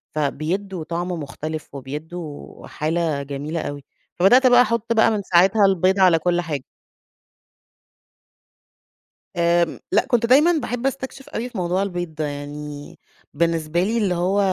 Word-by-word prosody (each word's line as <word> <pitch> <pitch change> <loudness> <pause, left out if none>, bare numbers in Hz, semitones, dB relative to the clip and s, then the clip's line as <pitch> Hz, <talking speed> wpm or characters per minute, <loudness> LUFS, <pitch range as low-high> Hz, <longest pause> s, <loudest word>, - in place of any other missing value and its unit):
فبيدّوا 165 +5 -2
طعم 170 +2 -3
مختلف 155 -1 -6
وبيدّوا 150 +3 -8
حالة 155 -2 -1
جميلة 145 +4 -4
أوي. 145 -1 -6 0.4
فبدأت 245 +9 +6
بقى 245 0 +7
أحط 230 0 0
بقى 225 0 +4
من 210 -2 -1
ساعتها 190 +4 +4
البيض 190 0 +2
على 180 -3 +5
كل 175 +1 +1
حاجة. 150 -6 -4 2.7
آمم، 170 -1 +2
لأ، - - +3
كنت 240 -2 +2
دايمًا 285 +8 +5
باحب 245 -4 -3
أستكشف 270 0 -6
أوي 240 +3 -4
في 235 - -9
موضوع 180 +2 0
البيض 175 -4 -4
ده. 155 - -2
يعني 145 0 -8 0.3
بالنسبة 165 +1 0
لي 225 +4 0
اللي 195 -6 +1
هو 185 +4 +1
175 Hz, 135 wpm, -22 LUFS, 155-205 Hz, 2.7 s, بقى